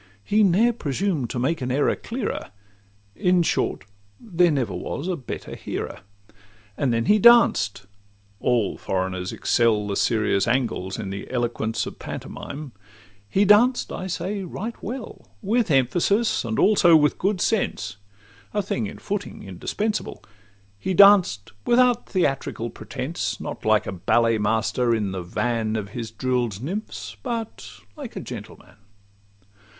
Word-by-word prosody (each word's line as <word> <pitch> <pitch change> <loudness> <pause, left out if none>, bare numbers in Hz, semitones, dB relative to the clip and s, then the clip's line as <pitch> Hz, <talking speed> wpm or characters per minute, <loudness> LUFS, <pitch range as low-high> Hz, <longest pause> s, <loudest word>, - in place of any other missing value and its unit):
He 210 - +2
ne'er 210 +5 +4
presumed 155 - -2
to - - -4
make 140 +6 0
an 125 0 -2
error 140 +3 +2
clearer;— 235 -2 -4 0.7
In 180 - +3
short, - - 0 0.4
there 180 -5 +2
never 130 - 0
was 155 - -4
a 185 - 0
better 135 -7 -7
hearer. - - -5 0.8
And 135 +1 0
then 115 0 0
he 210 +8 +4
danced;—all 100 - +2
foreigners 95 -1 -2
excel 110 -3 +2
The 100 -1 -2
serious 110 -3 +1
Angles 115 -6 -1
in 100 -3 -5
the 100 0 -6
eloquence 115 -3 -1
Of - - -8
pantomime;—he 105 - -5
danced, 235 +5 +4
I 185 - -4
say, 195 +3 -3
right 210 +6 -5
well, 240 +2 -7 0.2
With 225 +2 +1
emphasis, 175 - +2
and 110 -2 -3
also 185 -5 +5
with 150 -2 +3
good 195 0 0
sense— 110 - -1 0.6
A 205 - +1
thing 115 - -2
in - - -9
footing 205 -1 -5
indispensable; 205 - -3 0.6
He 185 - -2
danced 185 - +6
without 245 0 +3
theatrical 135 - -1
pretence, - - -4
Not - - -7
like - - +3
a - - -4
ballet 115 +5 +2
master 115 +3 +1
in 105 -3 -1
the 95 -1 -4
van 110 +5 -1
Of 105 -2 -3
his 115 -2 -5
drill'd 120 -2 -1
nymphs, 190 - -5
but 230 - -5 0.3
like - - -8
a - - -3
gentleman. - - -10
125 Hz, 135 wpm, -24 LUFS, -, 0.8 s, danced